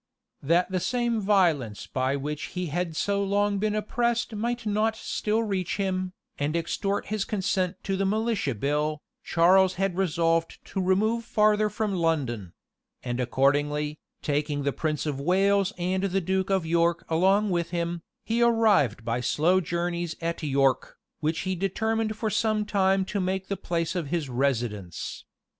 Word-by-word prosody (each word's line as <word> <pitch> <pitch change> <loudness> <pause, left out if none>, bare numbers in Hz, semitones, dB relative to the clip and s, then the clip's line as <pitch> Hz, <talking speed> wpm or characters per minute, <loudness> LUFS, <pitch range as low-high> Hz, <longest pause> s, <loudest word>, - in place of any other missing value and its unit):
That 170 +6 +2
the 185 - +1
same 240 +2 0
violence 170 - +2
by 130 +1 -1
which 150 +2 -4
he 180 - -1
had 175 -2 -1
so 200 +4 0
long 200 0 +1
been 210 +1 0
oppressed 235 +2 0
might 235 +2 -2
not 215 +1 +1
still 220 0 -1
reach 195 -4 -2
him, 185 -2 -1 0.3
and 145 +3 -1
extort 195 +5 -1
his 215 -2 0
consent 190 -3 -1
to 195 - -1
the 195 - 0
militia 210 - 0
bill, 150 +6 0 0.3
Charles 185 +2 +4
had 195 -1 0
resolved 165 -2 +1
to 195 - -3
remove 215 +5 +2
farther 215 -1 +3
from 215 -1 -2
London; 135 - -1 0.5
and 120 0 -3
accordingly, 145 +4 +1 0.2
taking 145 0 -1
the 140 -1 0
prince 155 -2 -2
of 145 -3 -2
Wales 195 +4 +3
and 185 +1 0
the 195 0 +1
duke 190 +1 -1
of 190 -3 +1
York 170 +1 +1
along 190 +5 +3
with 170 -1 0
him, 170 0 -2 0.2
he 230 +1 0
arrived 210 - +3
by 120 +1 -1
slow 160 +9 +3
journeys 170 0 -2
at 170 0 -3
York, 135 -3 +1 0.2
which 160 +1 -1
he 185 0 -1
determined 215 +4 -1
for 220 -2 -1
some 215 0 +1
time 195 -2 +2
to 200 +1 -3
make 190 +1 -2
the 200 - 0
place 170 -3 -2
of 170 -5 -2
his 155 -2 -2
residence. 120 - -2
180 Hz, 160 wpm, -26 LUFS, 150-205 Hz, 0.5 s, Charles